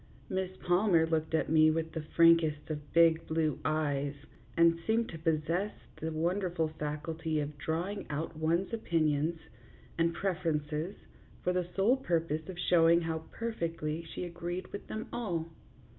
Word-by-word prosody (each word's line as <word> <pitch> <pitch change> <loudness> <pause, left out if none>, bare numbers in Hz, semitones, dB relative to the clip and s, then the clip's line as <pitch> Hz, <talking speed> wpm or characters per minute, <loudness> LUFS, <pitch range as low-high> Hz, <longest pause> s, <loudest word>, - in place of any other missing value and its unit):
Miss 190 -1 -1
Palmer 175 -2 +3
looked 160 0 0
at - - +1
me 155 0 +5
with 160 0 -1
the 160 - -4
frankest 160 -1 +4
of 150 -1 -6
big 165 -1 +4
blue 160 -3 0
eyes, 145 -2 0 0.4
and 165 0 +5
seemed 225 +1 +2
to 165 - -7
possess 165 +5 0 0.2
the 160 +1 -3
wonderful 170 0 0
faculty 155 +1 -3
of 145 0 -3
drawing 175 +7 -2
out 155 +2 -3
one's 165 +6 0
opinions 160 -5 +1 0.6
and 165 0 +3
preferences 165 -2 -1 0.5
for 180 - +1
the 180 -1 -1
sole 215 +7 +4
purpose 165 - -1
of 185 - -6
showing 170 -1 +5
how 160 -1 -3
perfectly 165 -8 -3
she 165 - -6
agreed 175 +1 -5
with 205 - -6
them 220 +1 -5
all. 175 -9 -2
165 Hz, 145 wpm, -31 LUFS, 155-180 Hz, 0.6 s, me